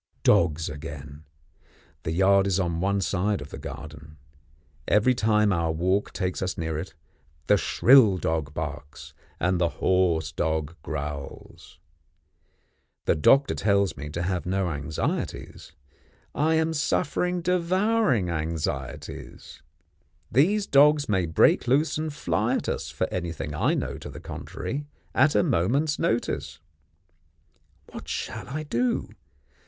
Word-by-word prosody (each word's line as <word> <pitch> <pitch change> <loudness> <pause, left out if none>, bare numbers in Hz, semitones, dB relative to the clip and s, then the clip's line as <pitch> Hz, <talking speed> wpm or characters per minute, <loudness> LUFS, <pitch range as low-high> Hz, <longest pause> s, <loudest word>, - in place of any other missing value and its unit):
Dogs 80 -1 +3
again. 75 0 -8 0.8
The 80 - -3
yard 95 +3 +4
is 95 -1 +1
on 85 -2 -1
one 100 +1 +1
side 100 +1 0
of 75 -1 -10
the - - -7
garden. 75 +2 -9 0.7
Every 105 +5 +4
time 105 -3 +2
our 85 -2 0
walk 95 +5 0
takes 90 -1 -3
us 95 0 -2
near 80 -1 -2
it, 90 +3 -8 0.5
the 105 - +5
shrill 115 -1 +5
dog 80 -4 -2
barks, 75 -2 -7 0.3
and 90 +1 +1
the 85 - +3
hoarse 85 -5 +1
dog 80 -2 -2
growls. 75 -3 -7 1.3
The - - +3
doctor 135 - +4
tells 100 -2 +1
me 75 +3 -7
to 85 +3 -3
have 90 0 -2
no 95 -1 0
anxieties. 75 +1 -4 0.6
I 160 +2 +2
am 160 0 +1
suffering 175 +3 0
devouring 180 - +2
anxieties. 80 -1 -5 0.7
These 195 - +3
dogs 145 - +4
may 95 -4 +1
break 80 - +3
loose 145 +5 +2
and 155 0 -2
fly 150 - 0
at - - -3
us, - - -3
for - - -1
anything 85 -3 -4
I - - +1
know - - -3
to - - -8
the - - -9
contrary, 145 +1 -6 0.3
at 145 +3 +3
a - - +4
moment's 140 - +1
notice. 75 -10 -1 1.3
What - - -9
shall - - -4
I 155 +4 -4
do? 125 -4 -1
95 Hz, 130 wpm, -26 LUFS, 80-135 Hz, 1.3 s, the